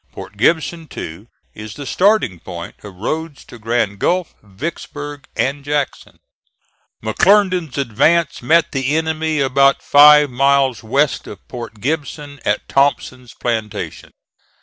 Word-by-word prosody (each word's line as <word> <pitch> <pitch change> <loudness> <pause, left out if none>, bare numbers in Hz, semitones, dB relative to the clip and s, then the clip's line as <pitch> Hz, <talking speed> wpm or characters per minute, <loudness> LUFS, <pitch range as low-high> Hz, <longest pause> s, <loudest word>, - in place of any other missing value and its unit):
Port - - -10
Gibson, 160 +7 0
too, 85 - -8 0.3
is 105 0 -9
the 145 - -7
starting 180 - +2
point 85 0 -8
of 100 -3 -10
roads 155 - -4
to 120 - -13
Grand 110 -3 -1
Gulf, 180 +5 0
Vicksburg 145 - -7
and 140 +2 -1
Jackson. 145 -1 -3 0.9
McClernand's 180 - +2
advance 140 +7 +1
met 160 +7 +3
the 135 +1 -1
enemy 160 -1 -1
about 135 +1 +3
five 150 0 +7
miles 135 -1 +2
west 135 +5 0
of 100 - -11
Port 115 -4 -8
Gibson 145 0 -4
at 105 - -1
Thompson's 130 -2 0
plantation. 110 -3 -4
140 Hz, 125 wpm, -18 LUFS, 115-155 Hz, 0.9 s, five